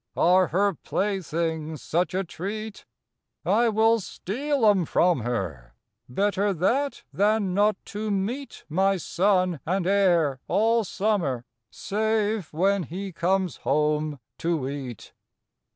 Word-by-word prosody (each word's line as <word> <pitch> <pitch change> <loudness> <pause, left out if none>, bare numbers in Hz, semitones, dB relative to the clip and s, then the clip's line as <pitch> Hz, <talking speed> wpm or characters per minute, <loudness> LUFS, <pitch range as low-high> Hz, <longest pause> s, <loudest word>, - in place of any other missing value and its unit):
Are 185 +1 +4
her 200 +3 +2
playthings 165 -5 -2
such 175 +3 0
a 190 - +1
treat? 205 +5 -6 0.6
I 235 0 +3
will 225 +1 +3
steal 260 +7 -2
'em 200 -4 +5
from 175 0 +2
her; 90 - -4 0.3
Better 200 +7 +1
that 265 - 0
than 205 -1 +2
not 205 +2 +3 0.2
to 215 +1 -3
meet 215 +8 -3
My 190 +5 +2
son 180 -1 +1
and 185 +2 -1
heir 175 -8 +3
all 225 +2 +2
summer, 180 - -1 0.2
Save 215 -2 -1
when 195 +5 +2
he 185 +5 -5
comes 185 +1 0
home 150 0 0 0.2
to 165 -6 -1
eat. 135 -5 -7
190 Hz, 120 wpm, -25 LUFS, 160-210 Hz, 0.6 s, em